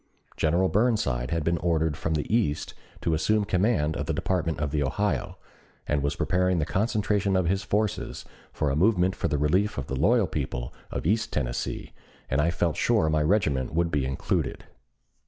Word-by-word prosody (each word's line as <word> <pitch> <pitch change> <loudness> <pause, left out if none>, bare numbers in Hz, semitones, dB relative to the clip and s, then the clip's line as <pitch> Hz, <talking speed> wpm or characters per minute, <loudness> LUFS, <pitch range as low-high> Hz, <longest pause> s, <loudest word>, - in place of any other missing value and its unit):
General 85 +4 +2
Burnside 95 - +1
had 85 0 -1
been 85 +1 +1
ordered 80 -2 +1
from 80 +2 -2
the 75 +8 0
East 100 -11 0 0.3
to 80 - 0
assume 105 +7 +2
command 90 -6 +1
of 75 - -3
the 80 - -1
Department 85 -3 -1
of 75 -1 -1
the 75 -1 0
Ohio, 100 +9 -1 0.5
and 75 -1 0
was 70 +1 -1
preparing 90 0 +1
the 75 - +1
concentration 105 -1 0
of 95 -1 +2
his 95 +3 +1
forces 105 +1 -2 0.3
for 75 -2 -1
a - - 0
movement 95 +1 +3
for - - -1
the 75 - 0
relief 90 +9 +1
of 70 - -3
the 65 - -4
loyal 105 - +3
people 65 -6 -4 0.2
of - - -4
East 110 +6 +1
Tennessee, - - -3 0.4
and 65 +3 +3
I 85 - +2
felt 85 -1 0
sure 80 -1 +2
my 75 0 +2
regiment 75 -6 +1
would 85 0 +1
be 75 -3 +1
included. 65 0 -2
85 Hz, 185 wpm, -26 LUFS, 75-100 Hz, 0.5 s, movement